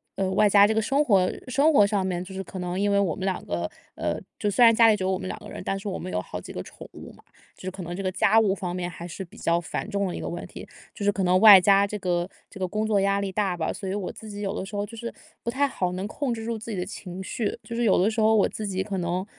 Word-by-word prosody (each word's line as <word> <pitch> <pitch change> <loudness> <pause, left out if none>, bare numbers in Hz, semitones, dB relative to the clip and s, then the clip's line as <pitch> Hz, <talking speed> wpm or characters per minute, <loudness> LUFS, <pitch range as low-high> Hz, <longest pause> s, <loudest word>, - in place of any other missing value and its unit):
呃， 195 -1 0
外 210 - +4
加 200 0 +7
这 220 - +2
个 220 - +2
生 275 +7 +2
活 190 -5 +4 0.2
生 285 +5 +4
活 205 -6 +6
上 200 -2 0
面 180 -1 -2
就 190 - -10
是 190 - -4
可 190 - -9
能 180 +1 -3
因 205 +1 +1
为 200 - +3
我 180 -6 +1
们 190 - -4
两 190 -1 -2
个 85 0 -2 0.3
呃， - - -2 0.2
就 210 - 0
虽 220 +5 +3
然 230 - +7
家 230 0 +6
里 215 - +5
只 190 - -4
有 190 - +1
我 185 - 0
们 185 - -5
2 - - -5
个 - - -11
人， - - -7
但 195 - -1
是 200 - -7
我 185 - -4
们 - - -6
有 90 - -1
好 90 - -7
几 - - -10
个 - - -4
宠 - - -12
物 - - -10
嘛， - - -19 0.4
就 - - -15
是 185 - -3
可 190 - -8
能 175 +1 -6
这 195 - -4
个 185 - 0
家 200 +3 +3
务 205 -4 +3
方 180 -2 -4
面 180 -1 -3
还 170 0 -9
是 185 +3 -6
比 170 - -17
较 170 +1 +1
繁 175 - -5
重 200 -2 -1
的 180 - -4
一 - - -5
个 - - -4
问 175 - -5
题。 - - -10 0.3
就 205 - -6
是 205 - +4
可 195 -1 -2
能 180 +1 +4
外 205 -4 +11
加 200 +2 +5
这 210 - -4
个 175 -1 -1 0.2
这 - - -12
个 185 - 0
工 215 +3 -2
作 205 -2 +2
压 200 0 +2
力 195 -1 -3
大 195 -2 0
吧， 160 - -1
所 195 - -7
以 190 - -2
我 200 -3 -3
自 220 - -11
己 205 - -7
有 200 0 -3
的 190 - -3
时 205 0 -6
候 205 - -1
就 230 +2 -11
是 235 +1 -6 0.3
不 - - -2
太 280 +3 +2
好 180 -8 -2
能 190 +3 -3
控 265 +2 -2
制 225 -1 -6
住 230 -1 -2
自 225 +1 -7
己 200 - -4
的 180 - -2
情 185 -1 -8
绪。 215 +2 -3
就 230 - -7
是 240 - 0
有 200 -5 +4
的 205 - +3
时 220 0 -1
候 220 +1 +5
我 205 - +4
自 215 - -5
己 190 -1 -2
可 195 -1 -4
能， 180 +1 -2
195 Hz, 355 characters per minute, -25 LUFS, 185-215 Hz, 0.4 s, 外